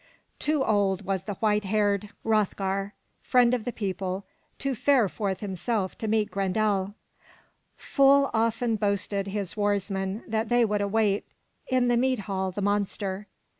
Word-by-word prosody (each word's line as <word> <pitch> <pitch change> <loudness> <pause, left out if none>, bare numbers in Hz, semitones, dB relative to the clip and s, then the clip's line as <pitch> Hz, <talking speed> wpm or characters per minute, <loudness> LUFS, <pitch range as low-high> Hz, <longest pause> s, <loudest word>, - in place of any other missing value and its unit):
Too 300 -2 +1
old 200 -2 +1
was 190 -1 -2
the 205 - -4
white 210 +1 +1
haired 205 0 +1 0.2
Hroth'gar, 200 -2 0 0.3
friend 250 -1 +4
of 235 -3 -1
the 245 - -1
people, 190 -2 -3 0.3
to 275 -1 -1
fare 255 -1 +3
forth 190 -1 -3
himself 195 0 -2
to 220 - -3
meet 215 -1 +1
Grendel. 200 0 0 0.8
Full 275 0 +4
often 230 0 +1
boasted 200 -1 0
his 195 -2 -3
warsmen 200 -1 -1
that 220 0 -1
they 240 -1 +4
would 210 -1 0
await 205 0 +1 0.4
in 255 -1 +2
the 240 -1 +3
mead 255 -2 +1
hall 190 -1 -2
the 190 +2 -4
monster. 205 0 -1
205 Hz, 145 wpm, -27 LUFS, 195-225 Hz, 0.8 s, friend